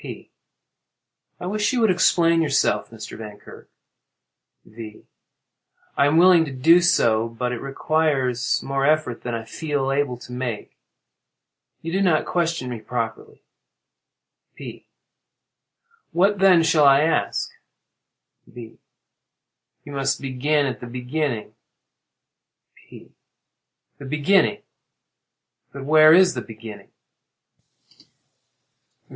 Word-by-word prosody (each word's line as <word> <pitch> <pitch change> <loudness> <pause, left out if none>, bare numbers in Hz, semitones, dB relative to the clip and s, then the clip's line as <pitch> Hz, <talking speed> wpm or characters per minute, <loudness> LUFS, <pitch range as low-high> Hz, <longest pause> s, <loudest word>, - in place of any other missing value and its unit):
P. - - -10 1.1
I - - -7
wish 210 +4 -1
you 250 -2 -1
would 220 -4 +4
explain 170 -2 +2
yourself, 140 -3 0
Mr. 110 -2 -10
Vankirk. 105 -2 -12 1.0
V. 110 -1 -12 0.9
I 140 - +3
am 150 +3 +1
willing 175 -1 +6
to 145 - -7
do 165 +7 +4
so, 115 -11 +2
but 125 +2 -4
it 125 - -5
requires 135 -3 -1
more 135 0 -2
effort 150 -4 0
than 120 -1 -4
I 115 - -5
feel 145 +1 -3
able 135 -3 -1
to 125 - -13
make. 125 -4 -6 1.1
You 165 - -5
do 190 +3 -1
not 175 -5 +2
question 165 -6 -2
me 120 -2 -6
properly. 115 0 -6 1.1
P. - - -11 1.2
What 195 +3 +1
then 185 -3 +5
shall 155 -2 +3
I 140 0 +6
ask? 160 +1 -1 1.0
V. 115 -2 -13 1.1
You - - -10
must 135 -1 -2
begin 140 +2 -1
at 130 -3 -4
the 125 - -9
beginning. 125 -1 -4 1.2
P. - - -17 0.9
The 140 - -10
beginning! 150 - +1 1.1
But 135 -1 -9
where 155 +1 +6
is 185 +2 +5
the - - -5
beginning? 110 -2 -11
140 Hz, 110 wpm, -22 LUFS, 125-165 Hz, 1.2 s, willing